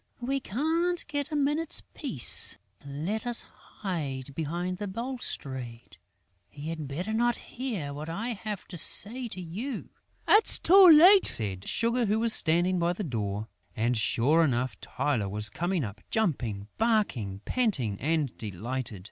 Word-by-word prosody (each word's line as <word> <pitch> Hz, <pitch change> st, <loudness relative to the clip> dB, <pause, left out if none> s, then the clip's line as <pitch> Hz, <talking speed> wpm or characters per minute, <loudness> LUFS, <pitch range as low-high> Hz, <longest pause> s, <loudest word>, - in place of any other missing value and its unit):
We 270 Hz, +3 st, -2 dB
can't 325 Hz, -, -1 dB
get 290 Hz, 0 st, -4 dB
a -, -, -3 dB
minute's 295 Hz, +3 st, -1 dB
peace. 165 Hz, -, +5 dB, 0.3 s
Let 160 Hz, -, -4 dB
us 240 Hz, -1 st, +4 dB
hide 140 Hz, -9 st, -7 dB
behind 175 Hz, +5 st, -4 dB
the 205 Hz, -, -4 dB
balustrade. 140 Hz, -, -6 dB, 0.5 s
He 145 Hz, +2 st, -8 dB
had 160 Hz, -3 st, -5 dB
better 175 Hz, +10 st, -4 dB
not 240 Hz, +2 st, +1 dB
hear 215 Hz, -, -6 dB
what 150 Hz, +3 st, -7 dB
I 215 Hz, +9 st, -4 dB
have 215 Hz, -3 st, -6 dB
to 175 Hz, -, -7 dB
say 240 Hz, -, +1 dB
to 190 Hz, -, -7 dB
you." 200 Hz, +10 st, -6 dB, 0.4 s
"It's 425 Hz, +1 st, +5 dB
too 380 Hz, +2 st, +6 dB
late," 360 Hz, +6 st, +7 dB
said 100 Hz, -4 st, +3 dB
Sugar, 235 Hz, +1 st, 0 dB
who 210 Hz, +2 st, +1 dB
was 230 Hz, -1 st, +4 dB
standing 175 Hz, +3 st, +3 dB
by 170 Hz, +1 st, +1 dB
the 205 Hz, -, -5 dB
door. 105 Hz, -, -4 dB, 0.3 s
And, 120 Hz, +3 st, 0 dB
sure 130 Hz, +8 st, +2 dB
enough, 130 Hz, -3 st, -1 dB
Tylô 115 Hz, -9 st, -2 dB
was 105 Hz, +1 st, +1 dB
coming 175 Hz, -, -2 dB
up, 105 Hz, -1 st, -8 dB
jumping, 120 Hz, -, -2 dB
barking, 170 Hz, -, 0 dB
panting 150 Hz, -, -1 dB
and 150 Hz, -3 st, -1 dB
delighted. 110 Hz, +2 st, -5 dB
175 Hz, 150 wpm, -27 LUFS, -, 0.5 s, late